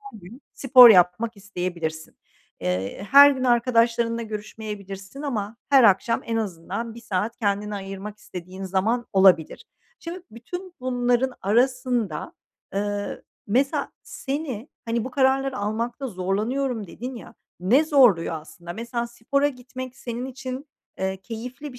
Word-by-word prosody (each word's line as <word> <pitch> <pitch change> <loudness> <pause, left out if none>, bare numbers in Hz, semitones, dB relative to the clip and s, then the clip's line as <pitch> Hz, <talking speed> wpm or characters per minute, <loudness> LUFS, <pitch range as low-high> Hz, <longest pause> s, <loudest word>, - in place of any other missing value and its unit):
her 275 -6 -12
gün 215 +10 -13
spor 255 -3 +8
yapmak 195 +4 +4
isteyebilirsin. 175 -5 -5 0.4
Eee, 95 - -3
her 285 +1 +10
gün 260 -2 -2
arkadaşlarınla 235 -1 +2
görüşmeyebilirsin 210 +1 -7
ama 225 -6 -3
her 270 -4 +7
akşam 210 +3 +4
en 230 -1 -2
azından 200 +3 -4
bir 235 - -10
saat 210 +1 -2
kendine 205 -1 -1
ayırmak 195 +1 -7
istediğin 185 +1 -9
zaman 215 +6 0
olabilir. 190 -5 +4 0.3
Şimdi, 345 +2 -7
bütün 355 - -8
bunların 250 0 +1
arasında, 240 - 0 0.4
eee, 205 0 -3 0.2
mesela, 260 +7 0
seni, 270 -3 -5 0.2
hani, 230 0 -1
“Bu 260 - -5
kararları 270 0 +1
almakta 230 +6 -2
zorlanıyorum.” 215 +4 -2
dedin 250 +8 -7
ya, 230 - -11 0.3
ne 250 - +4
zorluyor 245 - +4
aslında? 170 +2 -10
Mesela, 235 +2 -3
spora 280 +5 0
gitmek 255 -1 -8
senin 240 +1 -5
için, 265 +2 -6 0.3
eee, 190 0 -1
keyifli 250 +5 -7
bir 250 - -12
230 Hz, 130 wpm, -24 LUFS, 200-255 Hz, 0.4 s, her